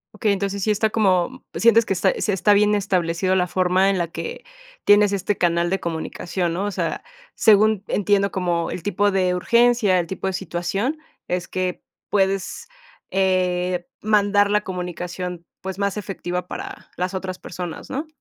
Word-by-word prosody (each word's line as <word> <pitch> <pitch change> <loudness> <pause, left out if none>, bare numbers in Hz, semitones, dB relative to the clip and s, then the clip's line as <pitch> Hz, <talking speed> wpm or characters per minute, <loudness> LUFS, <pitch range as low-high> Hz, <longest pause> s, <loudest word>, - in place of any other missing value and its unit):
Okey, 210 0 +1
entonces, 200 0 -2
sí 215 - +2
está 215 +1 +1
como, 200 +3 +1
sientes 230 0 +5
que - - -6
está 190 0 +2
sí 210 - +1
está 195 +2 +3
bien 210 +1 +4
establecido 185 -2 +1
la 180 -1 +2
forma 185 +2 +2
en 195 - +1
la 170 -1 0
que 470 - -7 0.4
tienes 205 0 +6
este 200 +1 -1
canal 170 0 +1
de 195 - -1
comunicación, 170 +1 -3
¿no?, 185 - -2
o 205 - -2
sea, - - -3 0.3
según 215 -1 +4
entiendo 200 0 +2
como 175 -3 -1
el 180 - -5
tipo 205 +1 +1
de 185 -2 +1
urgencia, 235 -2 +3
el 170 - -2
tipo 190 0 -4
de 190 - 0
situación, 195 - -2 0.3
es 180 -1 -2
que 185 -1 -3 0.2
puedes, 195 - -1 0.4
eh, 180 -2 +1
mandar 205 -1 +3
la 210 0 +3
comunicación, 180 -1 -5
pues, 190 +1 -6
más 200 +1 -1
efectiva 180 -3 -4
para - - -8
las 180 +1 -2
otras 185 -1 -4
personas, 175 -1 -7
¿no? 295 +4 -3
190 Hz, 170 wpm, -22 LUFS, 180-205 Hz, 0.4 s, tienes